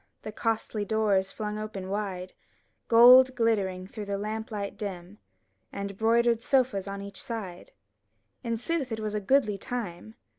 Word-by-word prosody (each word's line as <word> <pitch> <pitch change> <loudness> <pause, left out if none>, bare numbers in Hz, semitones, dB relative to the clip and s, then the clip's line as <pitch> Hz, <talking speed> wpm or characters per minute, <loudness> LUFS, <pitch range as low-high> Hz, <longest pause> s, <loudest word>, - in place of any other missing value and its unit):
The 215 - -6
costly 220 -1 -2
doors 205 -2 +1
flung 210 -1 -4
open 210 -3 -6
wide, 190 -2 -4 0.5
Gold 255 +3 +8
glittering 200 -6 0
through 210 +2 -7
lamp 210 +2 -4
light 205 -2 -4
dim, 195 0 -7 0.5
And 200 0 -5
broidered 230 +2 +2
sofas 250 -7 +1
on 200 0 -5
each 200 0 -7
side; 200 -7 -6 0.7
In 230 -1 -1
sooth 275 +1 -2
it 220 - -3
was 215 -1 -3
a 210 - -1
goodly 210 -3 +2
time. 175 - -6
210 Hz, 145 wpm, -28 LUFS, 200-230 Hz, 0.7 s, Gold